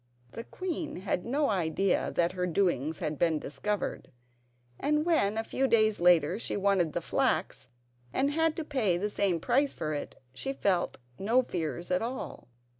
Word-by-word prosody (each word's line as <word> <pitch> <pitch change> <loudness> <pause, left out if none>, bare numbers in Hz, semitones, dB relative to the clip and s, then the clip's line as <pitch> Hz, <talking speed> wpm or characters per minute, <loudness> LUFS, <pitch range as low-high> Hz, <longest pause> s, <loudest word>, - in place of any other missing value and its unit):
The 230 - -7
queen 350 -4 -4
had 185 0 -2
no 280 +1 +1
idea 185 +1 +1
that 170 0 +2
her 180 -1 -2
doings 160 -4 0
had 150 -1 -3
been 165 -2 +3
discovered; 205 +8 -3 0.7
and 300 +1 +1
when, 220 -12 +2
a 225 - 0
few 265 +4 0
days 215 -3 +3
later, 175 +1 +4
she - - -2
wanted 195 -5 +2
the - - -1
flax, 130 - -1 0.4
and 275 +2 +1
had 320 +1 +1
to 325 - -3
pay 240 - +1
the 205 +3 -2
same 190 -5 +1
price 270 - +1
for 155 0 -3
it, 145 - -5
she 270 - -3
felt 190 -8 0 0.2
no 230 +6 +3
fears 175 -3 -4
at 180 - +2
all. 230 - -5
200 Hz, 170 wpm, -29 LUFS, 175-260 Hz, 0.7 s, later